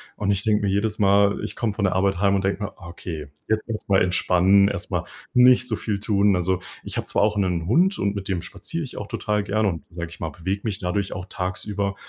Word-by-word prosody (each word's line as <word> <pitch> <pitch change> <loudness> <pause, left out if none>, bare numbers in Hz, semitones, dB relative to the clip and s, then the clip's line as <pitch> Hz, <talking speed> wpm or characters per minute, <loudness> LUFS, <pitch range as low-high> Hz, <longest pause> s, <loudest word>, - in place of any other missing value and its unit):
Und 100 -1 0
ich 100 0 0
denke 105 -1 +2
mir 95 - +1
jedes 105 +2 0
Mal, 100 0 +4
ich - - -5
komme 110 -3 -1
von 100 - -1
der 95 - +2
Arbeit 95 -1 +1
heim 100 0 +3
und 95 - 0
denke 100 +2 -1
mir: 105 - -4
„Okay, 85 -4 -7 0.2
jetzt 110 +1 0
erst 110 -3 -5
mal 95 - +4
entspannen, 95 +2 +4
erst - - -4
mal - - 0 0.3
nicht 125 0 +6
so 110 - 0
viel 105 -2 -3
tun.“ 100 -1 +3
Also, 90 +1 0 0.2
ich - - -6
habe - - -2
zwar - - +1
auch 105 0 +2
'nen 90 -4 0
Hund 185 - +3
und 100 - 0
mit 100 0 -5
dem 95 -4 -1
spaziere 165 - -4
ich 135 - -8
auch 105 - -5
total 105 -1 -1
gerne 105 +1 +1
und, 85 -3 -5
sage 85 0 -6
ich 85 - -13
mal, 80 - -3
bewege 95 +6 -3
mich 105 -3 -2
dadurch 95 +2 -2
auch 90 - -6
tagsüber, 100 +2 -3
100 Hz, 250 wpm, -23 LUFS, 95-105 Hz, 0.3 s, nicht